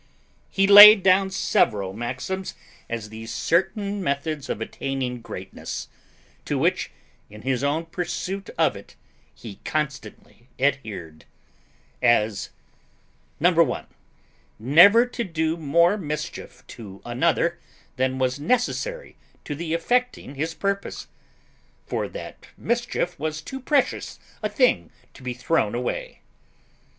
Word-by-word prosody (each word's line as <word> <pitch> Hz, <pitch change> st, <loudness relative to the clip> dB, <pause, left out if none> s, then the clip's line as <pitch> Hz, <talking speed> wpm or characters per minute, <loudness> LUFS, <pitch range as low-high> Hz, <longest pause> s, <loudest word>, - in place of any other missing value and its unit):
He 195 Hz, -, +2 dB
laid 205 Hz, 0 st, +11 dB
down 190 Hz, +1 st, +4 dB
several 100 Hz, -, +1 dB
maxims 125 Hz, -, -4 dB, 0.3 s
as 115 Hz, -2 st, -5 dB
the 110 Hz, +1 st, -9 dB
certain 195 Hz, -, -1 dB
methods 140 Hz, -1 st, -2 dB
of -, -, -2 dB
attaining 125 Hz, +1 st, -4 dB
greatness, 95 Hz, -4 st, -7 dB, 0.6 s
to -, -, -1 dB
which, -, -, 0 dB, 0.4 s
in 105 Hz, +1 st, -13 dB
his 130 Hz, 0 st, -1 dB
own 150 Hz, +4 st, 0 dB
pursuit 180 Hz, +3 st, -4 dB
of 160 Hz, -9 st, +2 dB
it, 100 Hz, -, -13 dB, 0.4 s
he 105 Hz, -4 st, -10 dB
constantly 140 Hz, -5 st, -5 dB
adhered. 110 Hz, -, -2 dB, 0.8 s
As 110 Hz, -4 st, +2 dB, 0.9 s
1. 170 Hz, -5 st, +2 dB, 0.7 s
Never 175 Hz, -, +6 dB
to 245 Hz, -1 st, -4 dB
do 160 Hz, -4 st, -1 dB
more 170 Hz, +5 st, +2 dB
mischief 150 Hz, -1 st, -6 dB
to 100 Hz, -4 st, -11 dB
another 170 Hz, +7 st, 0 dB, 0.4 s
than 130 Hz, 0 st, 0 dB
was 130 Hz, +1 st, 0 dB
necessary 250 Hz, -, -2 dB, 0.3 s
to -, -, -4 dB
the 160 Hz, +2 st, -3 dB
effecting 245 Hz, -, -1 dB
his 160 Hz, +4 st, -3 dB
purpose; 200 Hz, 0 st, -3 dB, 0.8 s
for -, -, -2 dB
that -, -, -10 dB
mischief 235 Hz, -7 st, -2 dB
was 155 Hz, +1 st, -3 dB
too 265 Hz, +12 st, -7 dB
precious 275 Hz, +1 st, 0 dB, 0.2 s
a -, -, -1 dB
thing -, -, +2 dB, 0.2 s
to -, -, -15 dB
be 125 Hz, -1 st, -4 dB
thrown 125 Hz, -4 st, 0 dB
away. 125 Hz, 0 st, -4 dB
155 Hz, 115 wpm, -24 LUFS, 125-190 Hz, 0.9 s, laid